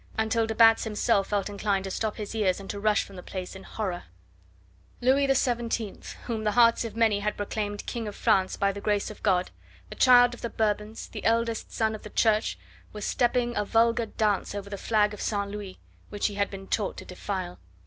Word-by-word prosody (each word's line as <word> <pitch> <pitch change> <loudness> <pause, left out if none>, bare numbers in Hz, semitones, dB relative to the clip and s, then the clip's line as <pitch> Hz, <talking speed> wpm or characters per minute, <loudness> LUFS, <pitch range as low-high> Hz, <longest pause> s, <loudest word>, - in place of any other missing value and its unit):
until 220 +1 +1
de 220 - -3
Batz 225 0 +6
himself 210 -2 +1
felt 205 -1 -1
inclined 200 -1 -1
to 195 - -5
stop 215 +2 -2
his 210 -1 -5
ears 200 -5 +1
and 195 - -9
to 205 - -6
rush 210 0 +2
from 195 - -13
the - - -7
place 185 0 -6
in 190 - -9
horror. 190 -4 -4 0.9
Louis 270 +2 +3
XVII, 235 -5 0 0.3
whom 225 -3 -3
the 210 -1 +1
hearts 230 0 +5
of 230 -2 -6
many 225 -3 +3
had 210 +1 -2
proclaimed 205 0 -3
King 230 -2 -4
of 205 - -6
France 190 -1 +2
by 200 0 +2
the 200 +1 -8
grace 205 0 0
of 215 - -13
God, 185 -3 +1 0.4
the - - -8
child 245 -1 +6
of 245 - -10
the 235 - -3
Bourbons, 215 0 -2
the 215 - -7
eldest 230 0 0
son 220 -1 0
of 215 - -7
the 210 - -9
Church, 215 0 +2 0.3
was 210 -1 -6
stepping 240 -1 +1
a 210 - +1
vulgar 230 +2 +2
dance 210 -2 0
over 200 0 -6
the - - -2
flag 210 -2 +2
of 210 - -8
St. 200 -2 -1
Louis, 205 -2 -7 0.3
which 205 - -3
he 210 - +1
had 200 0 0
been 195 -1 -8
taught 205 0 -1
to - - -8
defile. 185 -1 -5
210 Hz, 215 wpm, -27 LUFS, 200-230 Hz, 0.9 s, Batz